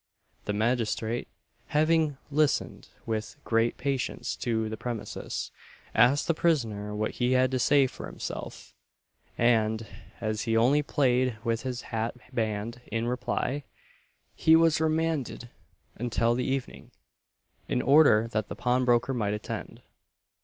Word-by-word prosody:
The 105 - -1
magistrate, 115 +1 0 0.4
having 155 -1 +2
listened 150 0 0 0.2
with 110 -1 -3
great 115 +1 +1
patience 135 -2 -2
to 110 -2 -1
the 110 - -4
premises, 115 -1 -5 0.4
asked 140 +4 +4
the 170 - +2
prisoner 110 -12 0
what 110 +1 -1
he 125 +1 0
had 130 0 +3
to 130 - 0
say 140 +2 +4
for 130 - -6
himself; - - -7 0.6
and, 110 -2 +2 0.3
as 110 -2 -2
he 115 -1 +1
only 130 +6 +4
played 130 -4 +1
with 115 -1 0
his 125 -1 -4
hat 115 +2 -1 0.2
band 110 +1 -2
in 115 +1 -1
reply, 125 +3 -2 0.7
he 160 - +5
was 165 -1 +4
remanded 155 -6 -1 0.4
until 115 0 0
the 125 +1 -1
evening, 135 -1 -3 0.8
in - - 0
order 135 -7 +6
that 110 -2 -2
the - - -6
pawnbroker 125 0 +2
might 105 -4 0
attend. 105 - -7
120 Hz, 130 wpm, -28 LUFS, 110-135 Hz, 0.8 s, order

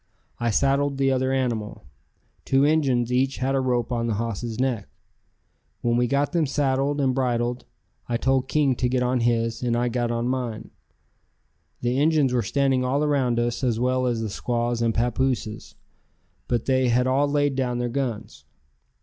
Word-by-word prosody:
I 120 - 0
saddled 140 +4 +1
the 135 0 +2
other 130 0 +1
animal; 120 -5 -2 0.6
two 135 +1 +3
Injuns 130 -6 +2
each 130 +2 +1
had 130 +1 -1
a 135 - +2
rope 125 -1 0
on 120 -1 -1
the 110 - 0
hoss's 115 +1 -4
neck. 125 -6 -1 0.9
When 120 0 +1
we 120 0 +2
got 140 +3 0
them 170 -4 +1
saddled 140 +1 0
and 135 -2 +2
bridled, 125 -1 -1 0.4
I 120 - +1
told 130 +1 +1
King 145 -4 +2
to 125 - 0
get 125 0 +1
on 125 0 +1
his, 115 -1 0
and 120 -1 0
I 120 +1 +1
got 120 0 -1
on 120 0 -1
mine. 125 -4 -3 1.1
The 120 +2 0
Injuns 150 -3 +3
were 125 - +2
standing 135 0 +1
all 135 +4 0
around 135 -5 +1
us 120 +2 -1
as 120 -3 +1
well 130 +1 +1
as 120 -2 -1
the 110 - -3
squaws 120 +1 -1
and 115 -1 +2
papooses, 120 -1 -2 0.7
but 120 -2 -1
they 130 -2 +2
had 125 +2 +2
all 135 +3 +2
laid 145 -1 +1
down 125 -2 -1
their 120 0 -1
guns. 120 -4 -4
125 Hz, 175 wpm, -24 LUFS, 120-135 Hz, 1.1 s, two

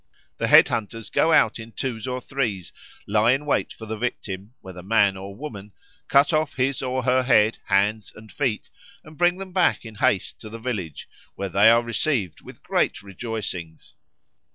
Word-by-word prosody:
The - - 0
head - - +7
hunters 115 0 -4
go 165 - +3
out 155 - +4
in 115 0 -10
twos 120 -3 -4
or 125 0 -2
threes, 120 -9 -3 0.3
lie 110 +4 +3
in 140 +3 -2
wait 145 - 0
for 110 - -10
the 110 0 -5
victim, 105 -2 -5
whether 95 -1 -10
man 100 0 +3
or 95 +1 -8
woman, 105 -8 -8 0.3
cut 140 +4 +4
off 155 -1 0
his 135 +1 0
or 130 0 -2
her 130 +1 +3
head, 115 -4 +3
hands, 105 +2 +1
and 105 0 -14
feet, 130 -7 -2 0.3
and 155 +1 -14
bring 175 +3 +2
them 190 -1 -8
back 180 -8 +2
in 110 - -9
haste 100 -2 0
to 110 - -9
the 115 - -8
village, 105 - -5 0.3
where 100 -1 -4
they 100 +4 +5
are 115 +1 +5
received 120 - -1
with - - -14
great - - 0
rejoicings. 95 -5 -6
115 Hz, 180 wpm, -24 LUFS, 100-130 Hz, 0.3 s, head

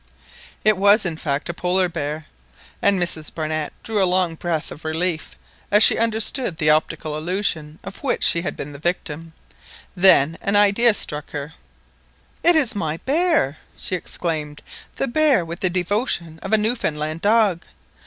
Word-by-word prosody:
It 215 -2 +4
was, 205 +2 +5
in 170 -3 -2
fact, 150 -2 -3
a 175 - -3
Polar 180 +1 0
bear, 155 -2 -5 0.6
and 200 -2 +4
Mrs 160 -3 -1
Barnett 155 -1 -3
drew 215 -3 -1
a 185 - +2
long 180 -2 +1
breath 165 -1 -3
of 150 - -11
relief 160 +1 -3 0.3
as 210 +1 +5
she - - +7
understood 225 - -1
the 155 -1 +3
optical 155 0 -1
illusion 160 -2 -2
of 195 +1 -9
which 275 - -1
she 170 - +3
had 175 - -5
been 145 - -6
the 140 - -10
victim. 165 -1 -3 0.6
Then 170 -4 +5
an 200 - 0
idea 205 +3 +4
struck 150 -5 -5
her. 145 +1 -6 0.9
"It 345 0 +5
is 275 -7 +4
my 160 -6 -3
bear!" 300 - +1 0.2
she - - -3
exclaimed, 155 -4 -4 0.3
"the 270 - -1
bear 270 - +2
with 170 +1 -6
the 185 - +1
devotion 175 -3 -1
of - - -6
a 220 - +5
Newfoundland 165 -9 -2
dog! 205 -4 +3
175 Hz, 165 wpm, -21 LUFS, 155-205 Hz, 0.9 s, she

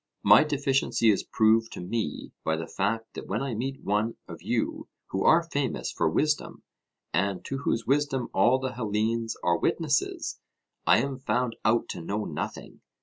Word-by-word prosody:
My 105 +7 +8
deficiency 135 -6 +2
is 100 - +1
proved 115 +1 +3
to - - -7
me 95 -2 -3
by 80 - +1
the 80 0 -4
fact 115 +6 -2
that - - -7
when 105 +6 -1
I 135 -3 -2
meet 135 +5 -4
one 105 +3 0
of - - -9
you - - -2 0.2
who 95 - -1
are 165 +2 +6
famous 145 -6 -2
for 80 - +1
wisdom, 150 - 0 0.5
and 95 +2 0
to 135 - -3
whose 115 -4 -1
wisdom 135 -2 +1
all 120 +7 +4
the 130 -1 -3
Hellenes 115 0 -1
are 85 -1 +2
witnesses, 150 -4 0 0.5
I - - +7
am 135 -1 -4
found 125 -2 0
out 115 +1 +2
to - - -5
know 105 +5 -2
nothing. - - -6
115 Hz, 170 wpm, -27 LUFS, 105-135 Hz, 0.5 s, My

